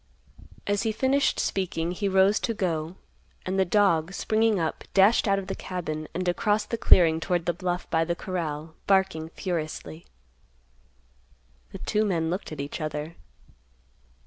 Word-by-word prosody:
As 205 0 0
he 225 - 0
finished 270 +5 +1
speaking, 175 -3 -1
he 195 +2 -1
rose 190 +2 +4
to 230 - -2
go, 165 -3 -2 0.5
and 190 +1 -1
the 190 - +4
dog, 185 -3 +2
springing 220 -2 +1
up, 160 -2 -2
dashed 200 +4 +5
out 195 0 +3
of 195 - -3
the - - -4
cabin 155 -4 -5
and 185 +1 -3
across 210 +3 +1
the 230 - -3
clearing 165 -7 +5
toward 175 0 -1
the 175 - +1
bluff 180 0 -3
by 165 -1 +3
the 170 +1 -1
corral, 160 -4 -4
barking 190 -5 +2
furiously. 165 -2 -5 1.6
The - - -7
two 215 - 0
men 170 -5 0
looked 185 0 -4
at 155 - -7
each 140 +3 -5
other. 155 +1 -4
180 Hz, 155 wpm, -26 LUFS, 160-200 Hz, 1.6 s, dashed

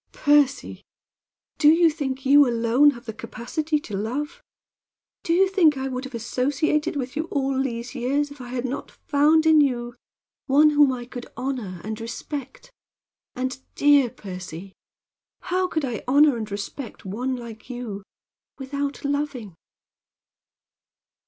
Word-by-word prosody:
"Percy, 290 -2 +2 0.8
do 295 - +5
you 330 +1 +5
think 270 -4 -4
you 285 +1 +7
alone 235 +5 +4
have 240 -4 -6
the 220 - -5
capacity 300 +8 -3
to 210 - -6
love? 285 - -3 0.8
Do - - -3
you 375 +3 +5
think 345 -7 +3
I 265 0 -2
would 255 0 -4
have 260 -2 -8
associated 290 +7 0
with 260 -1 -4
you 310 +2 -1
all 270 -4 -1
these 240 -2 -4
years 280 +3 -1
if 285 -2 -11
I 245 - -8
had 245 0 -3
not 260 +2 -4
found 305 +2 +2
in 315 -1 +6
you 240 -4 0 0.5
one 300 +2 +5
whom 290 -2 +5
I 245 -2 -5
could 245 0 -8
honor 245 -8 -4
and 215 +1 -5
respect? 280 - -7 0.6
And, 260 0 -3 0.2
dear 285 -3 +5
Percy, 185 -4 -9 0.7
how 370 +1 0
could 315 -5 -1
I 235 -5 -4
honor 285 +1 +5
and 220 -2 -5
respect 205 +5 -7
one 245 +7 -2
like 235 -1 -10
you, 240 -5 -5 0.6
without 280 +1 -4
loving?" 285 - -2
265 Hz, 145 wpm, -24 LUFS, 240-295 Hz, 0.8 s, you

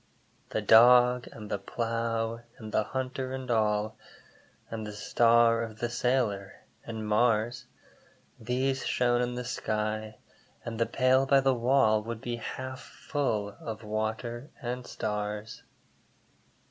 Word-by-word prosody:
The 110 - -2
Dog, 125 +3 +6
and 105 -2 -9
the 100 - -1
Plough, 115 +1 -2 0.2
and 110 -2 -9
the 105 - +1
Hunter 130 +1 -3
and 130 -1 -5
all, 105 -1 +1 0.7
And 110 -1 -4
the 105 - -6
star 115 +2 +4
of 110 -2 -6
the 120 +1 -2
sailor, 115 -6 0 0.3
and 110 -1 -5
Mars, 115 +1 +1 0.7
These 130 +3 -1
shone 120 -1 +2
in 125 0 -1
the 125 0 -4
sky, 110 -1 -2 0.5
and 115 -1 -5
the 115 - +2
pail 130 +1 +3
by 140 0 +6
the 135 0 +3
wall 120 -3 +3
Would 115 +1 -5
be 120 -1 -3
half 130 +3 -6
full 110 -9 -2
of 110 -1 -6
water 110 +4 -3
and 125 +1 -4
stars. 105 0 -4
115 Hz, 135 wpm, -29 LUFS, 110-125 Hz, 0.7 s, Dog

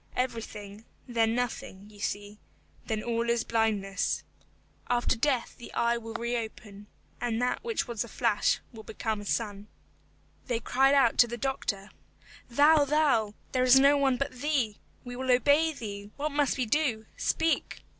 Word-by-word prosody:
Everything, 225 -4 -4 0.2
then 230 -2 +1
nothing; 225 -5 -4
you 205 - -16
see, 205 +1 -4 0.5
then 215 -1 -2
all 235 0 -1
is 235 -1 +2
blindness. 210 -4 0 0.7
After 245 +1 +2
death 250 0 0
the 240 - -10
eye 235 0 +2
will 225 -1 -8
reopen, 225 -3 -4 0.3
and 235 -2 -1
that 250 +7 0
which 460 -8 -1
was 235 -4 -2
a - - -10
flash 225 -2 +1
will 220 - -9
become 220 -1 -3
a - - -9
sun. 205 -1 -2 0.8
They 240 -3 0
cried 270 +4 +3
out 270 -4 +3
to 240 - +7
the 240 +1 -5
doctor, 215 -6 -3 0.6
"Thou, 290 +5 +5
thou, 275 -8 +2 0.2
there 255 -1 +2
is 255 +1 +7
no 280 +2 +6
one 270 -3 +2
but 275 +2 -2
thee. 255 -5 -1 0.2
We 245 0 -7
will 260 +1 -4
obey 285 +6 +4
thee, 205 -7 -7
what 300 +2 -2
must 285 -2 +1
we 255 - 0
do? 230 -3 0
Speak." 325 0 0
235 Hz, 160 wpm, -29 LUFS, 220-270 Hz, 0.8 s, to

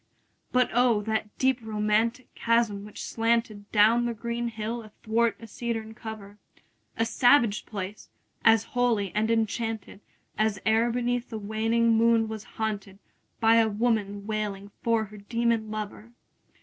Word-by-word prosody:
But 250 -1 +2
O, 240 -3 +3
that 220 0 -1
deep 260 -1 +2
romantic 220 +3 0
chasm 230 -3 +1
which 210 - -8
slanted 225 -3 -1
Down 225 +3 +5
the 235 -1 -2
green 235 +1 -3
hill 225 +1 -4
athwart 225 +1 -1
a 230 - -10
cedarn 225 0 -4
cover! 215 -3 -9 0.6
A 225 - +2
savage 245 -3 +3
place! 200 -1 -6 0.3
as 225 -1 +6
holy 230 -6 +1
and 215 +1 +1
enchanted 225 -2 -1 0.4
As 215 -2 +2
e'er 225 +2 +3
beneath 245 +1 -1
a 220 - -3
waning 225 +2 +1
moon 225 0 +4
was 220 -1 -6
haunted 205 -3 -3
15 - - -40 0.4
By 225 0 +6
woman 205 -2 -1
wailing 205 -2 -3
for 230 -1 +1
her 210 +1 -13
demon 230 +1 0
lover! 215 +1 -6
220 Hz, 140 wpm, -27 LUFS, 210-235 Hz, 0.6 s, as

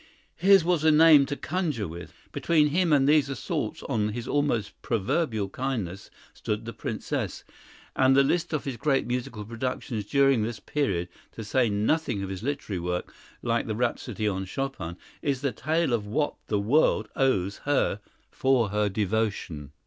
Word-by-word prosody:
His 195 +1 +5
was 175 -3 +2
a 160 - +5
name 155 -2 +7
to 145 - -2
conjure 155 - -2
with. 85 +2 -8 0.2
Between 155 -3 +2
him 175 +2 +1
and 140 -2 +4
these 150 -2 +4
assaults 135 -4 -3
on 105 -1 -1
his 120 +1 -5
almost 145 -8 0
proverbial 110 - 0
kindness 105 -7 -4 0.2
stood 105 +1 -3
the 115 - -6
Princess, - - -4 0.5
and 130 0 +4
the 140 - +6
list 170 +5 0
of 155 -3 -1
his 135 -4 -4
great 135 +3 +1
musical 125 -3 -3
productions 115 -1 -4
during 135 -1 +3
this 110 0 -3
period, 100 -9 -1 0.3
to 110 - -7
say 120 +2 +2
nothing 105 +2 0
of 95 - -4
his 95 -1 -5
literary 135 -7 -3
work, 90 +1 -3 0.3
like 115 0 0
the 110 - -2
rhapsody 115 -2 -1
on 95 -1 -1
Chopin, 95 -7 -4 0.2
is 140 -3 -1
the 140 -2 0
tale 155 +4 0
of 105 -3 -1
what 145 +8 0
the 105 - +1
world 110 -1 +3
owes 100 -8 +1
her 140 -7 +1 0.3
for 130 -5 +2
her 105 0 +1
devotion. 100 -8 -2
120 Hz, 165 wpm, -27 LUFS, 105-145 Hz, 0.5 s, name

